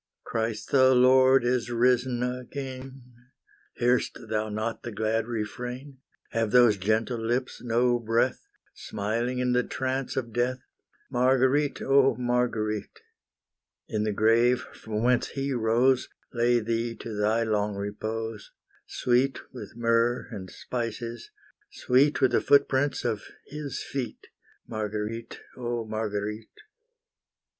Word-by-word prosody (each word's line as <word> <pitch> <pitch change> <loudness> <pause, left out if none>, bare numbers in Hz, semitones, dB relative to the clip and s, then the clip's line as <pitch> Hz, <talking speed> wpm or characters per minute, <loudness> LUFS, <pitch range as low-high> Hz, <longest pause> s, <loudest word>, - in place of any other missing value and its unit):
Christ 110 -1 -3
the 130 -1 +6
Lord 130 0 +5
is 120 -1 0
risen 125 +1 +2
again, 130 +1 -6 0.7
Hear'st 125 +1 +1
thou 110 0 -1
not 110 +2 -3
the 120 - -6
glad 110 +1 -1
refrain, 125 +4 -5 0.3
Have 115 -1 0
those 120 -2 +6
gentle 110 +4 0
lips 120 +3 -2
no 120 +1 +2
breath, 115 +2 0 0.3
Smiling 115 +5 -3
in 125 0 +1
the 125 0 +3
trance 130 +1 -3
of 120 -4 -3
death? 125 +2 0 0.5
Marguerite, 130 +3 +2
oh 135 -2 +4
Marguerite! 120 -4 -1 0.9
In 105 -1 -1
the 110 - 0
grave 115 +4 +3
from 110 0 -4
whence 125 0 +3
He 135 0 -3
rose, 120 +2 +2 0.2
Lay 120 0 +3
thee 115 +1 -2
to 115 - -7
thy 110 +3 +2
long 105 -2 0
repose, 110 +2 -4 0.4
Sweet 125 +2 0
with 125 - -9
myrrh 115 +1 +1
and 95 -4 -7
spices, 115 +1 -5 0.4
sweet 140 +4 +2
With 130 -2 +4
the - - +3
footprints 140 -1 +2
of 110 -4 -1 0.2
His 145 -1 -5
feet, 130 -4 -5 0.4
Marguerite, 110 +1 -4
oh 120 -2 -3
Marguerite! 105 0 -3
120 Hz, 120 wpm, -27 LUFS, 110-125 Hz, 0.9 s, the